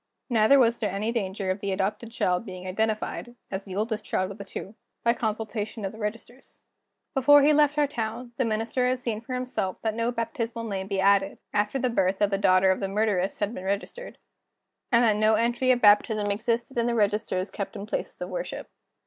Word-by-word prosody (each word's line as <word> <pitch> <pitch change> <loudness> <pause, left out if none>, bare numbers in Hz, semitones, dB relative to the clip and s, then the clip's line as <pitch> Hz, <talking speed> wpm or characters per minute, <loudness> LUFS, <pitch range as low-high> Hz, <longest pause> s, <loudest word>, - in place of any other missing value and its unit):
Neither 225 +4 +5
was 235 -3 +3
there 210 - 0
any 200 +4 -2
danger 195 -4 -2
of 185 - -3
the 200 0 -2
adopted 210 +4 -2
child 180 -5 0
being 185 -3 -8
identified 220 +4 -2 0.2
(as 195 0 -4
the 190 -2 -7
oldest 215 +1 -2
child 185 -2 -1
of 200 - -10
the - - -5
two) 195 +1 -8 0.3
by 235 - +4
consultation 220 -1 -3
of 190 - -3
the 220 - -12
registers. 230 +4 -7 0.5
Before 290 +1 +6
he 300 +2 +5
left 295 0 +3
our 295 - +4
town, 235 -2 -4
the 260 - +2
Minister 225 +3 0
had 255 0 0
seen 230 -3 -3
for 255 +2 -5
himself 250 -7 -2
that 220 -1 0
no 230 +2 0
baptismal 230 0 -3
name 195 -3 -3
had - - -13
been 195 -1 -1
added, 195 0 +3 0.2
after 210 +5 +1
the 255 - +1
birth 190 -5 +1
of 205 -1 +2
the 195 - 0
daughter 190 -1 +4
of 190 - 0
the 195 - -2
murderess 195 -2 0
had 205 +2 -1
been 185 - -7
registered, 200 - -4 0.7
and 235 0 +5
that 215 -3 +3
no 215 +1 +4
entry 240 +3 +1
of 245 -1 +2
baptism 210 0 +4
existed 235 +4 -1
in 235 - +1
the 240 - 0
registers 205 -3 0
kept 205 +2 -5
in 200 -1 -6
places 215 - -4
of - - -5
worship. - - -5
215 Hz, 215 wpm, -26 LUFS, 200-235 Hz, 0.7 s, Before